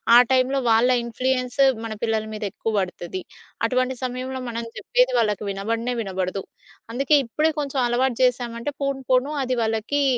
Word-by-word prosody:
ఆ - - +11
టైమ్‌లో 260 +1 +3
వాళ్ళ 225 +2 +5
ఇన్‌ఫ్లుయన్స్ 255 +2 -2 0.3
మన 220 - -4
పిల్లల 220 -1 0
మీద 215 - -6
ఎక్కువ 225 - -3
పడుతది. 180 -1 -4 0.4
అటువంటి 255 +2 0
సమయంలో 255 +1 -3
మనం 230 0 -3
చెప్పేది - - +2
వాళ్ళకి 210 -1 0
వినబడనే 230 +5 -2
వినబడదు. 190 -1 -3 0.5
అందుకే 275 +5 +3
ఇప్పుడే 305 +7 +1
కొంచెం 280 -2 -2
అలవాటు 245 0 +1
చేశామంటే 240 0 0
పోను 275 -1 -1
పోను 260 +4 +3
అది 255 -1 -1
వాళ్ళకి 225 +6 0
245 Hz, 145 wpm, -23 LUFS, 225-260 Hz, 0.5 s, ఆ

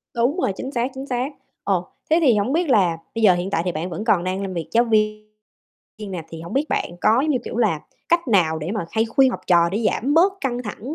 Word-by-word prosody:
Đúng 245 +9 +1
rồi, 200 - +1
chính 265 - -6
xác, 245 +1 -1
chính 265 +1 -7
xác. 250 +2 -1 0.3
Ồ, 185 -3 0 0.2
thế 320 - +4
thì 250 -8 +5
hổng 210 +7 0
biết 335 -2 +1
là 180 -8 +3 0.2
bây 225 - -2
giờ 195 -4 +6
hiện 175 +2 -2
tại 165 -4 0
thì 180 - 0
bạn 170 +4 -4
vẫn 190 +5 -5
còn 185 -6 +3
đang 185 +1 -2
làm 190 -1 -4
việc 170 -2 -4
giáo 235 +1 +4
viên 215 -2 +1 0.9
nè, 175 -3 -4
thì 165 -1 -9
hổng 170 - -8
biết 275 +3 +1
bạn 175 - -2
có, 220 +6 +4
giống 310 - 0
như 255 - +2
kiểu - - -6
là, 205 -11 +1 0.3
cách 340 -5 +2
nào 165 -7 +3
để 160 +4 -4
mà 205 -7 -3
hay 220 0 +1
khuyên 260 +3 +3
học - - -5
trò 170 -1 +4
để 220 +2 -1
giảm 280 +5 -1
bớt 365 +4 +5
căng 250 -2 -2
thẳng 245 +7 -6
215 Hz, 265 wpm, -22 LUFS, 180-255 Hz, 0.9 s, giờ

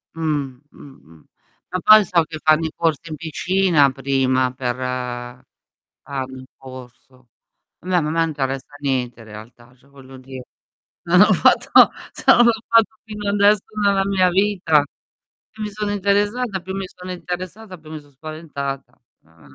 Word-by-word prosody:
Mh. 145 -5 -2
Mh. - - -16 0.2
Mh. 80 -1 -20 0.5
Ma 185 - -2
poi 215 0 +7
so 175 -3 +2
che 155 0 -9
fanno 155 +1 +3
i 160 - -3
corsi 165 -1 -1
in 155 - -5
piscina 165 -2 +1
prima 130 -1 0
per 125 -1 -3
hanno 125 -1 -6 0.7
il 130 - -12
corso. 130 -1 -14 0.5
Vabbè 180 0 0
ma 150 - -2
a - - -2
me 165 0 +1
interessa 135 -2 -4
niente 125 -4 -2
in 115 - -13
realtà, 120 +3 -14
cioè 130 +2 -27
voglio 135 -1 -15
dì 130 0 -10 0.7
non 180 +2 +4
ho 210 - +6
fatto - - +5 0.2
se - - -11
non 240 - +5
l'ho 235 - +5
fatto 225 -1 +3
fino 210 -2 -6
adesso 205 0 +4 0.2
nella 195 -1 +2
mia 185 -2 +2
vita. 185 -6 +2 0.7
Più 220 - -8
mi 210 - -3
sono 210 0 -3
interessata 205 +2 0
più 190 +1 -6
mi 195 -1 -4
sono 185 0 -10
interessata, 185 +3 -7
più 155 0 -14
mi 155 - -6
so' 145 -1 -21
spaventata. 140 -2 -7 0.3
Ah, - - -22
155 Hz, 165 wpm, -20 LUFS, 130-190 Hz, 0.7 s, poi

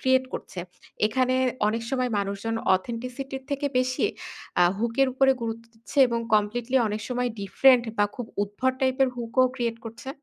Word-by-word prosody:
create 260 0 +3
করছে, 180 - -6 0.5
এখানে 255 +3 +1 0.3
অনেক 225 +1 -1
সময় 255 -2 0
মানুষজন 200 +3 -2 0.2
authenticity 245 +7 -4
এর - - -20
থেকে 280 +1 -1
বেশি 255 +5 0 0.6
আ - - +7 0.2
hook 230 +1 -1
এর 270 - +4
উপরে 270 +1 +4
গুরুত্ব 230 0 -4
দিচ্ছে 225 +5 -7
এবং 235 0 -1
completely 230 +5 +1
অনেক 210 +1 -3
সময় 250 0 0
different 250 +4 +5
বা 205 - +5
খুব 245 -3 -5 0.2
উদ্ভট 205 +6 -1
টাইপের 260 0 +3
hook 230 -1 -5
ও - - +6
create 235 -2 -2
করছে? 230 +4 -8
240 Hz, 170 wpm, -26 LUFS, 225-260 Hz, 0.6 s, আ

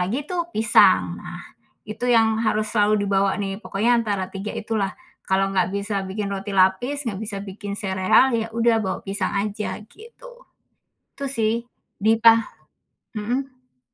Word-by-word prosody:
lagi 230 +11 -2
tuh 345 -1 -2
pisang. 220 +1 +4
Nah, - - -8 0.5
itu 220 +3 -4
yang 225 -2 +3
harus 215 -1 +1
selalu 210 -1 +2
dibawa 195 0 +2
nih, 195 -1 -3
pokoknya 225 +4 0
antara 200 -4 -2
3 195 +2 -5
itulah, 215 -3 -2 0.3
kalau 195 0 +1
nggak 185 -1 +2
bisa 200 0 -2
bikin 200 +1 -4
roti 200 +1 -5
lapis, 245 +11 +2
nggak 200 -3 -3
bisa 205 -2 -3
bikin 200 +1 -7
sereal, 190 +6 +3
ya 225 -1 -1
udah 230 0 +3
bawa 190 - -2
pisang 195 -1 -1
aja, 210 +1 -2
gitu. 470 - -15 0.9
Gitu 280 - -5
sih. 225 -3 +1 0.4
Di 220 +3 +3
pa 230 -1 +8 0.8
Mhm. 255 +3 -5
215 Hz, 150 wpm, -22 LUFS, 195-230 Hz, 0.9 s, pa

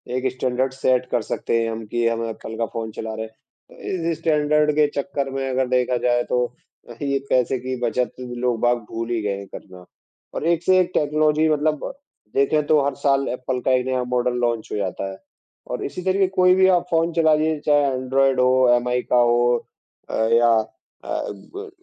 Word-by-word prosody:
एक 130 - -2
standard 130 +1 -1
set 130 -1 +1
कर 120 - +1
सकते 115 +1 -1
हैं 115 - -1
हम 110 0 -6
कि 120 -1 +1
हम 115 0 -1
एप्पल 110 0 -7
का 115 - 0
फ़ोन 110 -1 -4
चला 110 +1 -6
रहे 110 - -4
हैं। 110 - -14 0.4
तो 170 -3 -3
इस 160 - -3
स्टैन्डर्ड 150 -1 +2
के 150 -1 +4
चक्कर 140 -2 -2
में 135 0 -3
अगर 130 0 0
देखा 125 0 +1
जाए, 120 0 +1
तो 125 0 -1 0.4
यही 140 +4 -4
ये 140 - +1
पैसे 125 0 +2
की 130 +1 -4
बचत 120 +1 0
लोग 120 -1 -2
बाग 120 0 +3
भूल 115 +1 -4
ही 115 -2 -1
गए 100 -1 -2
है 100 - -8
करना। 90 -1 -12 0.5
और - - -4
एक 170 0 +1
से 185 +1 +4
एक 180 0 +1
टेक्नॉलजी 155 +1 +2
मतलब 150 - 0 0.4
देखें 145 +2 +2
तो 155 -1 +4
हर 140 -2 -1
साल 140 -1 +1
एप्पल 125 0 -3
का 130 - +1
एक 125 0 +2
नया 130 -1 0
मॉडल 125 0 0
लॉन्च 120 -2 -1
हो - - -2
जाता 95 0 -3
है, 95 - -10 0.5
और - - -4
इसी 180 - -5
तरीके 190 +1 +2
कोई 180 0 +6
भी 190 0 +5
आप 175 - -3
फ़ोन 165 +1 +2
चलाइए, 155 -1 +2
चाहे 145 -1 +4
एंड्रॉयड 130 +1 +1
हो, 130 0 +4
एमआई 125 0 0
का 125 - +5
हो 120 0 +3 0.5
अ, - - -3 0.2
या 120 0 +5 0.6
अ, - - -10 0.2
गूगल 400 - -10
130 Hz, 205 wpm, -22 LUFS, 120-150 Hz, 0.6 s, कोई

